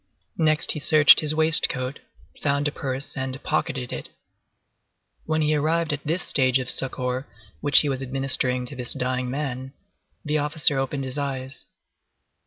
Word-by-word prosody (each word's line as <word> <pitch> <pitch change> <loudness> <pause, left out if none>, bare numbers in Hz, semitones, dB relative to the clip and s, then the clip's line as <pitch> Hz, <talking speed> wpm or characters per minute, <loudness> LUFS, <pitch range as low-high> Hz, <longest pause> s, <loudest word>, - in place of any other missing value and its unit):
Next 155 -1 +4
he 150 - -3
searched 155 0 +6
his 155 0 +1
waistcoat, 155 -4 +3 0.4
found 145 0 0
a - - -2
purse 135 0 -4
and 130 -1 -4
pocketed 130 -2 -3
it. - - -7 1.2
When 155 0 0
he 150 - +1
had 150 - +1
arrived 160 +1 0
at 145 - -5
this 165 +4 -2
stage 130 -2 +2
of 130 -1 +1
succor 130 0 -3 0.3
which 145 - +5
he 150 - -2
was 135 -2 -3
administering 130 -1 0
to 140 - -8
this 125 -2 -3
dying 125 -1 -2
man, 130 -1 -5 0.5
the 150 0 0
officer 150 -1 0
opened 135 +1 -3
his 130 +2 -5
eyes. 135 -1 -5
135 Hz, 160 wpm, -23 LUFS, 130-150 Hz, 1.2 s, searched